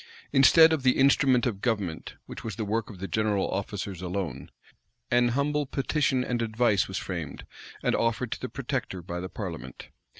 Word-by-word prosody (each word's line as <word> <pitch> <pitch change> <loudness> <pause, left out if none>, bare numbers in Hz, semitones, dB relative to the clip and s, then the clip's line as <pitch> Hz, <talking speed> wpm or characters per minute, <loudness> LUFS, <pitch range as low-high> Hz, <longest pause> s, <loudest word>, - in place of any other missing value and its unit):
Instead 160 +4 +7
of 155 - 0
the 130 0 +3
"instrument 135 -2 +4
of 105 -6 -2
government," 100 -9 -2
which - - -9
was 110 -4 -5
the 110 - -3
work 110 +2 -1
of 105 - -10
the 95 +2 -5
general 105 +1 0
officers 95 -1 -4
alone, 90 -7 -4 0.6
"an 120 0 +4
humble 140 +3 0
petition 135 -1 0
and 120 -1 -2
advice" 110 -3 +2
was 95 - -4
framed, 85 -8 -5 0.4
and - - +2
offered 115 +1 0
to - - -3
the 130 - -4
protector, 125 - -4
by 85 0 -5
the 90 +1 -5
parliament. 90 -7 -7
110 Hz, 175 wpm, -27 LUFS, 95-130 Hz, 0.6 s, Instead